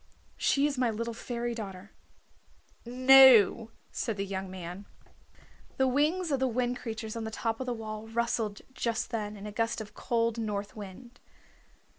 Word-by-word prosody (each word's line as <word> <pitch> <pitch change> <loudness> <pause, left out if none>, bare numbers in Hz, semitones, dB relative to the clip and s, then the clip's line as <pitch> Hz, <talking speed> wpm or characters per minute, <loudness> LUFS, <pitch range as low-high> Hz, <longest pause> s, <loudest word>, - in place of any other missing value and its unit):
She 280 +1 +2
is 285 -3 -1
my 250 -2 +2
little 230 +1 -3
fairy 240 +1 -4
daughter." 200 -3 -7 1.0
"No," 250 -3 +7 0.2
said 225 -4 -3
the 195 - -2
young 190 -1 -4
man. 185 +1 -8 0.9
The 265 - +3
wings 305 +6 +1
of 275 - +1
the 265 - +2
Wind 245 0 -1
Creatures 220 -1 -5
on 230 - -4
the 220 - -3
top 225 +1 -2
of 260 - -4
the 245 - 0
wall 215 -1 -6
rustled 225 -2 -1
just 230 -2 -2
then 210 -2 -3
in 200 - -9
a 210 - -5
gust 230 +2 -1
of 210 -1 -8
cold 230 0 0
north 205 -2 -3
wind. 225 +4 -10
230 Hz, 165 wpm, -29 LUFS, 210-245 Hz, 1.0 s, No